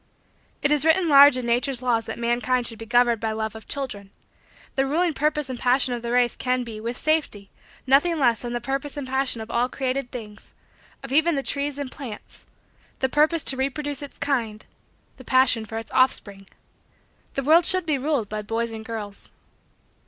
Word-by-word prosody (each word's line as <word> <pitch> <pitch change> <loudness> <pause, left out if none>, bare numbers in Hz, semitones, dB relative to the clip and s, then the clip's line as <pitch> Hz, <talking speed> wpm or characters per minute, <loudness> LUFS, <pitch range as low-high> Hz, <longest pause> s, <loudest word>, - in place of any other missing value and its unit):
It 295 - +2
is 300 -1 +5
written 325 +3 +3
large 280 -2 +8
in 250 - -3
Nature's 245 +2 0
laws 230 -2 +1
that 225 - -5
mankind 240 +1 0
should 225 -2 -4
be 225 - -8
governed 240 -1 +3
by 220 -1 -1
love 220 0 -3
of 220 - -11
children. 245 -8 -5 0.6
The 270 0 0
ruling 330 +4 +1
purpose 300 0 0
and 255 -2 -6
passion 255 0 +2
of 240 - -4
the 235 0 -4
race 245 -1 +2
can 255 0 -1
be, 225 -3 -8
with 235 +3 -4
safety, 300 -11 -1 0.3
nothing 290 +6 +3
less 240 -6 +3
than 240 -1 -4
the 240 - -1
purpose 275 +3 -3
and 285 - -4
passion 265 -3 -1
of 220 - -8
all 245 +2 +1
created 265 -1 -3
things 215 -5 -10 0.5
of 270 - -8
even 315 +3 +3
the 275 - -2
trees 285 0 -2
and 280 -3 -5
plants 245 -7 -9 0.5
the 265 - 0
purpose 305 +3 +2
to 265 - -1
reproduce 280 +1 -2
its 285 - -9
kind 235 -7 -2 0.5
the 260 - -12
passion 255 -3 +3
for 225 +1 -6
its 225 - -7
offspring. 200 -7 0 0.9
The 275 - -1
world 325 +5 +5
should 370 -2 +4
be 300 -4 0
ruled 275 -5 -1
by 215 +1 -4
boys 225 +2 -2
and 220 -1 -7
girls. 215 -3 -5
255 Hz, 195 wpm, -24 LUFS, 230-280 Hz, 0.9 s, large